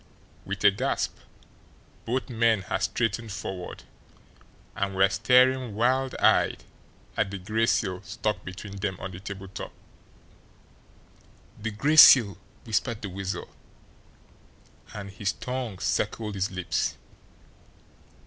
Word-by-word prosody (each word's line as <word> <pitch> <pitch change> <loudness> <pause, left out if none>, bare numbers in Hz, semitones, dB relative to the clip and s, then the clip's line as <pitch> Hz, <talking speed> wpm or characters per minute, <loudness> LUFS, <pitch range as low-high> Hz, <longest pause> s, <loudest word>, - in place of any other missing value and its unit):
With 100 0 -5
a 100 - +8
gasp, 100 - -1 0.9
both 130 +3 -1
men 115 -4 +2
had - - -3
strained 115 0 -1
forward, 95 -2 -6 0.9
and 100 -1 -2
were 95 +1 +5
staring, 125 +1 +3
wild 130 +4 +1
eyed, - - +3 0.5
at 105 - 0
the 100 - -5
gray 110 +4 0
seal 95 -6 0
stuck 105 +1 -3
between 95 +2 -8
them 95 -1 -3
on 95 - -6
the 90 - -9
tabletop. 95 -1 -7 1.9
"The 110 - -2
Gray 140 +9 0
Seal!" 105 - +9 0.2
whispered 115 0 -1
the 100 - -3
Weasel, 95 +1 -4 1.4
and 100 -1 -7
his 95 0 -2
tongue 125 -5 -4
circled 105 +2 -1
his 95 0 -1
lips. 95 -1 -2
100 Hz, 115 wpm, -27 LUFS, 95-115 Hz, 1.9 s, Seal